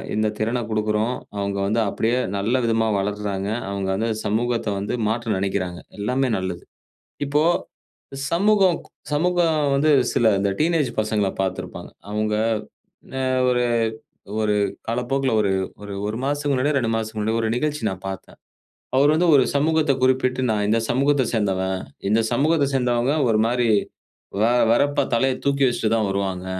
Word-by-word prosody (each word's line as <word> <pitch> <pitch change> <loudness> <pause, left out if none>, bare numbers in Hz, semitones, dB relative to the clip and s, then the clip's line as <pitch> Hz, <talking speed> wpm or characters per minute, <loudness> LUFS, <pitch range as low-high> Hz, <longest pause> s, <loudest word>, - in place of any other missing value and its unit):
இந்த 110 0 +1
திறன 115 +3 0
குடுக்குறோம். 110 +2 0 0.2
அவங்க 100 0 -2
வந்து 110 +3 +1
அப்டியே 115 +5 0 0.2
நல்ல 120 +6 +1
விதமா 115 -1 +1
வளர்றாங்க. 100 0 -2 0.2
அவங்க 100 -1 -3
வந்து 115 +4 -1 0.2
சமூகத்த 115 +2 0
வந்து 100 +4 -2
மாற்ற 115 0 -1
நனைக்குறாங்க. 95 -2 -2 0.2
எல்லாமே 130 +5 0
நல்லது. 95 -2 -4 0.6
இப்போ 145 +2 +2 0.9
சமூகம் 190 0 +3 0.3
சமூகம் 160 -2 +2
வந்து 155 +3 +3 0.2
சில 115 -2 +3
இந்த 100 0 +1
டீனேஜ் 155 -5 +2
பசங்கள 105 -2 0
பார்த்திருப்பாங்க. 95 -1 -5 0.2
அவங்க 105 0 0 0.7
என்ன - - -9 0.3
ஒரு 125 0 +2 0.8
ஒரு 105 -1 +1 0.3
காலப்போக்குல 125 +3 0
ஒரு 100 -2 +1 0.3
ஒரு 100 -1 -7
1 110 - -3
மாசத்துக்கு 145 0 0
முன்னாடியோ, 140 +3 +1
2 120 -3 -1
மாசத்துக்கு 110 -1 -3
முன்னாடியோ 110 +2 0
ஒரு 110 - 0
நிகழ்ச்சி 150 +1 -2
நான் 95 0 -8
பார்த்தேன். 95 -1 -8 0.6
அவரு 145 +2 +5
வந்து 170 +2 +2
ஒரு 130 - +6
சமூகத்த 155 0 +2
குறிப்பிட்டு, 130 0 +2
நான் 105 -1 +1
இந்த 110 +2 +3
சமூகத்த 135 +2 +2
சேர்ந்தவன். 95 -4 0 0.3
இந்த 110 +3 +3
சமூகத்த 145 +4 +2
சேர்ந்தவங்க 125 +1 +1 0.2
ஒரு 110 -2 +2
மாரி. 120 0 +1 0.7
வ - - +4 0.3
வெறப்பா 140 +5 +3
தலைய 130 +2 +2
தூக்கி 140 0 +2
வச்சிட்டு 120 -3 0
தான் 110 -2 +1
வருவாங்க. 95 -2 -2
115 Hz, 145 wpm, -22 LUFS, 105-140 Hz, 0.9 s, ஒரு